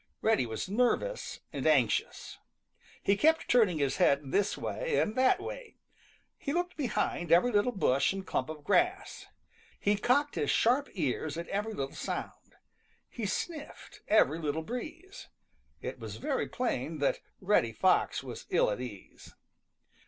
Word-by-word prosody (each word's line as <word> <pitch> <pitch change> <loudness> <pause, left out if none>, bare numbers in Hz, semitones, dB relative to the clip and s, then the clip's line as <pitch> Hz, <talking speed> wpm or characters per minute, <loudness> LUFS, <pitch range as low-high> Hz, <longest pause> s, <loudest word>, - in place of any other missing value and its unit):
Reddy 220 - +3
was 110 -1 -4
nervous 250 - 0
and - - -1
anxious. - - +1 0.6
He 200 - +3
kept 320 +8 +3
turning 215 -9 +4
his 140 -2 0
head 140 -1 +2
this 200 +1 +1
way - - -2
and 215 - +1
that 260 +8 +4
way. 485 +3 -8 0.6
He 280 - -3
looked 355 +1 -1
behind 215 - -1
every 180 +9 +5
little 210 +3 +2
bush 140 - +2
and 195 0 -5
clump 130 - -2
of 155 -2 -7
grass. 360 - 0 0.5
He 205 +1 +2
cocked 285 +7 +2
his - - -1
sharp 255 +5 +3
ears 155 -2 -2
at 170 - -5
every 210 +2 -2
little 135 0 -4
sound. - - -6 0.6
He 225 -4 -3
sniffed 300 - -5
every 165 -7 +4
little 155 0 -2
breeze. 325 - -7 0.5
It - - -5
was - - -7
very - - -2
plain - - -2
that - - +1 0.2
Reddy 185 - +2
Fox 110 - +2
was - - -8
ill - - +3
at 105 - -3
ease. 105 -7 -10
210 Hz, 150 wpm, -30 LUFS, -, 0.6 s, every